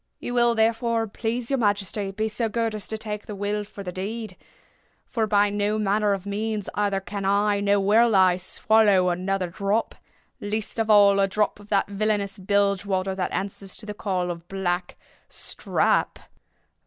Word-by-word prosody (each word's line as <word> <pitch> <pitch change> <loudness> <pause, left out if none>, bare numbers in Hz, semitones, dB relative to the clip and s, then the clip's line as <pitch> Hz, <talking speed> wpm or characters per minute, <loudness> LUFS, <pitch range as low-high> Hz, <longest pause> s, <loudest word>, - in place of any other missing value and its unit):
You 245 - -5
will, 240 -1 +3
therefore, 230 +1 +1
please 230 +3 -3
your 270 - +1
majesty, 205 -2 0
be 215 +3 -2
so 225 +1 -1
good 230 0 -1
as 210 -2 -4
to 220 - -3
take 210 -1 -6
the 210 - -6
will 205 +1 -2
for 205 -1 -10
the 180 - -5
deed—for 215 +2 -7
by 205 -1 +3
no 205 +1 0
manner 210 0 +1
of 195 -1 -4
means 210 0 -3
either 200 -2 0
can 200 +1 -6
I 200 +1 +2
or 200 0 +4
will 215 +3 +4
I 185 -2 +5
swallow 195 0 +3
another 185 0 -1
drop—least 205 +2 -4
of 225 -1 0
all 200 -2 +6
a 195 - +3
drop 210 +1 0
of 205 0 -15
that 200 -2 +2
villainous 200 0 -1
bilge 200 0 +1
water 190 -1 -1
that 185 -1 -2
answers 195 0 -4
to 210 - -10
the 210 - -5
name 180 -4 0
of 170 0 -9
'Black 180 -2 -2 0.3
Strap. - - 0
205 Hz, 170 wpm, -24 LUFS, 195-215 Hz, 0.3 s, all